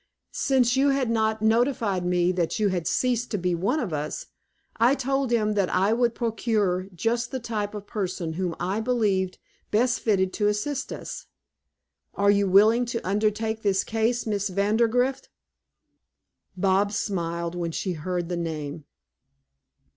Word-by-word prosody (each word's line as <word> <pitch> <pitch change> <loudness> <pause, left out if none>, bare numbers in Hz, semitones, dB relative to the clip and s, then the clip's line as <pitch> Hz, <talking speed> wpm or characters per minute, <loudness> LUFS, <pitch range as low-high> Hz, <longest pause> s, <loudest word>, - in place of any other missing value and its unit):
Since 255 -3 +2
you 275 +2 +3
had 270 -4 +1
not 220 -1 0
notified 225 -4 +2
me 180 0 +2
that 175 -3 -1
you 210 -2 +2
had 175 -4 -2
ceased 240 +6 0
to 210 - -1
be 180 -1 0
one 190 - 0
of 205 - -3
us, 150 0 -3 0.5
I 245 +4 +4
told 270 0 -1
him 215 -3 +1
that 200 -3 +1
I 195 +4 +2
would 235 0 +1
procure 215 -5 0
just 235 +6 0
the 260 - -4
type 215 -3 -3
of 205 -1 -7
person 185 -6 -3
whom 175 -1 -2
I 185 +4 -1
believed 210 -6 0 0.3
best 240 +3 +2
fitted 190 -4 +1
to 205 - +1
assist 230 +7 -2
us. - - -7 0.9
Are 200 0 +4
you 200 -1 +2
willing 215 +6 +5
to 230 -4 -4
undertake 215 +2 0
this 195 -2 +1
case, 225 +2 0
Miss 205 -2 -1
Vandergrift?" 230 +7 +1 1.3
Bobs 195 +2 +2
smiled 170 -3 -2
when 175 -1 -2
she 185 +3 -2
heard 175 +2 -3
the 175 0 -3
name. 155 -2 -4
210 Hz, 155 wpm, -25 LUFS, 185-235 Hz, 1.3 s, willing